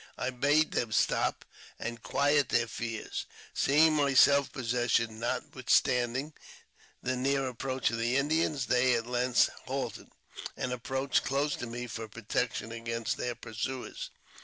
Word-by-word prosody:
I 125 - -1
bade 145 +5 +2
them 115 -2 -1
stop, - - +1 0.3
and 120 0 -5
quiet 145 +2 +2
their 120 - +3
fears. 115 -1 -5 0.3
Seeing 155 +3 +4
my 140 -2 +2
self 140 +1 +6
possession, 120 -2 0
notwithstanding 130 +1 0 0.7
the 130 +1 0
near 135 +1 +1
approach 130 -1 -1
of 115 - -3
the 120 +3 +1
Indians, 150 -1 +1
they 125 0 +3
at 115 -1 -1
length 125 0 +2 0.2
halted, - - -4 0.5
and 125 0 -2
approached 130 +2 0
close 140 +2 0
to 120 - -5
me 120 +1 -5
for 115 -1 -6
protection 115 +1 -2
against 115 -1 -3
their 120 -1 -2
pursuers. 120 +2 -5
125 Hz, 135 wpm, -30 LUFS, 115-140 Hz, 0.7 s, self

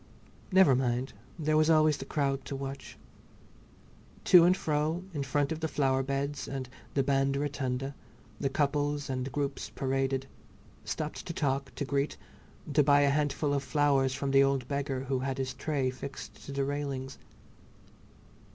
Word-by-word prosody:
Never 190 -7 +6
mind, 125 +1 -1 0.2
there 155 -2 +1
was 155 +1 +4
always 155 -2 +5
the 135 - -7
crowd 140 -2 -1
to 140 - -4
watch. 135 0 -7 1.3
To 175 -2 +8
and 180 +2 +4
fro, 155 +3 0
in 145 - -2
front 140 +1 0
of 160 - -2
the 160 - -1
flower 135 -3 +1
beds 140 +2 -2
and 135 -2 -4 0.3
the 135 - +3
band 135 0 +1
rotunda, 135 -2 -2 0.5
the 135 - 0
couples 145 0 0
and 130 +1 -3
groups 140 0 -3
paraded, 135 0 -1 0.6
stopped 155 -1 -4
to 170 - -3
talk, 140 -3 -1
to 145 - -2
greet, 140 +1 -1 0.6
to 150 - +5
buy 145 0 +5
a 140 -1 +4
handful 145 0 0
of 140 - +1
flowers 135 -2 +2
from 140 -1 -2
the 135 0 +6
old 135 -2 +1
beggar 140 -2 -2
who 135 0 -1
had 135 +1 -2
his 130 -1 -2
tray 140 -5 -1
fixed 115 -5 -9
to - - -5
the 140 0 -1
railings. 140 -2 -4
140 Hz, 160 wpm, -30 LUFS, 135-145 Hz, 1.3 s, To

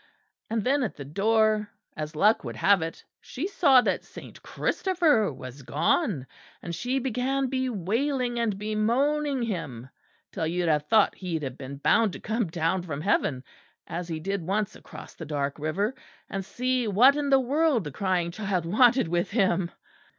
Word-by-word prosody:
And 225 -1 -1
then 275 +4 +2
at 245 - -2
the 140 - -8
door, 215 +6 +2 0.3
as 155 0 -5
luck 210 +8 +3
would 120 -4 -6
have 195 - +4
had 160 - 0
it, 165 - -12
she 275 - -5
saw 280 -10 +5
that - - -1
Saint - - -12
Christopher 325 - +1
was 130 0 -10
gone; 150 - 0 0.3
and 170 - -6
she 245 +9 -1
began 265 +1 -1
bewailing 250 - -1
and 220 -4 0
bemoaning 250 +7 0
him 145 - -4 0.4
until 160 - -2
you'd 175 +1 -1
have 150 -1 +1
thought 215 +2 +4
he'd 170 -5 -4
have 130 -2 -4
been 135 +1 -7
bound 215 +7 +3
to - - -7
come 220 -1 -1
down 165 +3 0
from 155 -5 -5
heaven, 155 -8 0 0.4
as 175 +1 -5
he 160 -2 -4
did 195 +3 -2
once 195 +5 -1
across - - -11
the - - -9
dark 145 -1 -2
river, 190 - -1 0.4
and 195 -1 -3
see 250 +3 -1
what 245 +8 +6
in 290 -1 -1
the 270 -1 +6
world 275 - +2
the 150 - -6
crying 180 +1 -1
child 195 -3 -2
wanted 240 +5 +4
with 175 +1 0
him." 190 -5 +1
205 Hz, 170 wpm, -27 LUFS, 165-250 Hz, 0.4 s, what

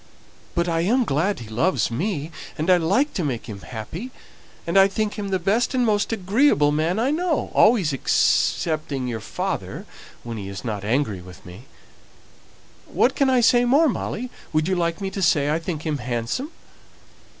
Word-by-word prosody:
But 170 0 +1
I 165 -1 0
am 240 +9 +2
glad 165 - 0
he 115 - -8
loves 120 +8 0
me, 160 - -2 0.3
and 160 +4 +1
I 180 - +6
like 200 - +1
to 180 - -2
make 130 -6 -3
him 105 -3 -7
happy, 125 - -7 0.6
and 170 - -3
I 195 0 +7
think 210 +1 -2
him 205 -2 -5
the 190 - +1
best 215 +9 0
and 250 -1 +2
most 210 -1 +1
agreeable 200 - +3
man 160 +5 0
I 245 +5 +1
know, 330 -1 -1
always 200 - +4
excepting 145 0 +1
your 115 -2 -3
father - - -4 0.4
when 115 -1 -6
he 100 -2 -6
isn't 100 +4 -7
angry 105 0 -1
with 90 0 -14
me. 95 +7 -12 1.2
What - - +2
can 275 -2 +2
I 255 -2 +4
say 240 +1 +5
more, 280 +7 +4
Molly? 245 +1 -4 0.2
would 155 +1 +1
you 190 - +1
like 170 +2 -1
me 195 -1 -3
to 195 - -4
say 145 -5 +3
I 160 - +1
think 165 -2 -5
him 150 -3 -1
handsome?" 120 - -3
170 Hz, 180 wpm, -23 LUFS, 135-215 Hz, 1.2 s, I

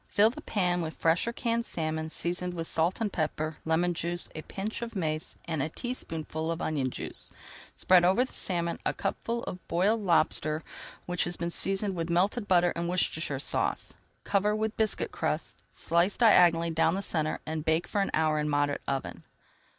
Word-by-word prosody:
Fill 215 +2 +5
the 300 - -9
pan 180 -8 0
with 160 -1 -4
fresh 165 +6 +2
or - - 0
canned 235 0 -1
salmon, 160 -4 -3
seasoned 180 +2 -2
with 165 -1 -3
salt 165 +3 +1
and 215 -3 -1
pepper, 155 -1 -2
lemon 170 +2 +2
juice, 175 +1 -2
a 155 - -5
pinch 200 +8 -4
of 230 -1 -5
mace, 155 -4 -2
and 160 -4 -2
a 155 - -1
teaspoonful 160 - -4
of 165 0 -2
onion 140 -4 -1
juice. - - -6 0.5
Spread 180 -1 +5
over 190 +8 +4
the - - -14
salmon 170 -2 0
a - - -1
cupful 230 +4 -2
of 180 - -5
boiled 205 +6 +2
lobster 160 -4 +2 0.4
which 180 0 -1
has 175 0 -3
[Page - - -15
289] - - 0
been 170 - -2
seasoned 195 +2 0
with 165 -1 -3
melted 200 +6 +1
butter 175 -2 +4
and 170 0 -2
Worcestershire 160 -5 0
Sauce. 135 - -1 0.3
Cover 205 +1 +1
with 220 0 -1
biscuit 220 -1 0
crust, - - -2
slit 170 +4 +1
diagonally 170 -7 +5
down 165 +1 +2
the 195 - -2
centre, 155 -4 -1
and 155 -1 -3
bake 160 +2 +1
for 205 - -1
an 195 - 0
hour 155 -1 +2
in 150 - -1
a - - -1
moderate 145 0 +1
oven. 135 -1 -3
175 Hz, 195 wpm, -29 LUFS, 160-195 Hz, 0.5 s, Fill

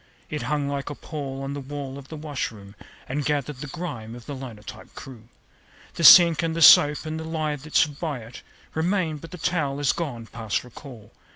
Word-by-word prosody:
It - - -3
hung 145 +3 -1
like 140 0 -3
a 145 - -6
pall 135 -3 -6
on 135 +1 -4
the 145 - -5
wall 140 0 -7
of 135 - -13
the 160 - -8
washroom, 115 -10 -5 0.3
And 145 +3 -2
gathered 145 -1 -2
the 145 - -7
grime 130 -9 -6
of 120 - -12
the 145 - -6
linotype 120 -6 -10
crew. 120 -5 -11 0.7
The 170 - -4
sink 170 +1 +9
and 165 -1 -2
the 165 - -2
soap 145 +1 +7
and 155 0 -4
the - - -5
lye 155 -2 -2
that 150 +2 -11
stood 150 -3 +3
by 150 -7 -3
it 115 +2 -11 0.3
Remain; 165 -1 0
but 165 +3 -11
the 180 - -9
towel 155 -5 -1
is 145 -2 +2
gone 130 -9 -5
past 110 -1 -3
recall. 125 -3 -13
145 Hz, 205 wpm, -24 LUFS, 130-155 Hz, 0.7 s, sink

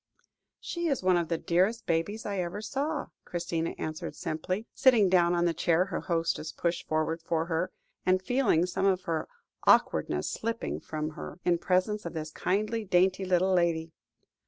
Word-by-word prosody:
"She 345 -1 -3
is 275 - 0
one 185 -1 +4
of 170 -1 +1
the 165 - 0
dearest 185 +9 +1
babies 170 +7 -1
I 200 -2 -2
ever 175 +3 -3
saw," 280 +7 -2
Christina 170 -1 -3
answered 155 0 -5
simply, 185 +7 -3
sitting 230 -7 +5
down 175 -1 +4
in 175 0 +2
the 170 - +2
chair 170 +2 +2
her 195 - -3
hostess 165 -2 -1
pushed 170 0 -2
forward 155 +1 0
for 165 0 -1
her, 170 +2 -1 0.3
and 185 0 +3
feeling 205 -5 +2
some 190 +2 0
of 185 -1 +2
her 165 -1 -2 0.4
awkwardness - - +3
slipping 230 +1 -3
from 155 0 -4
her, 155 - -8
in 175 -1 +3
presence 185 +4 +1
of - - -7
this 155 -1 -5
kindly, 215 +7 -1
dainty 185 0 +2
little 185 +1 +2
lady. 165 -2 +1
180 Hz, 170 wpm, -29 LUFS, 165-200 Hz, 0.4 s, sitting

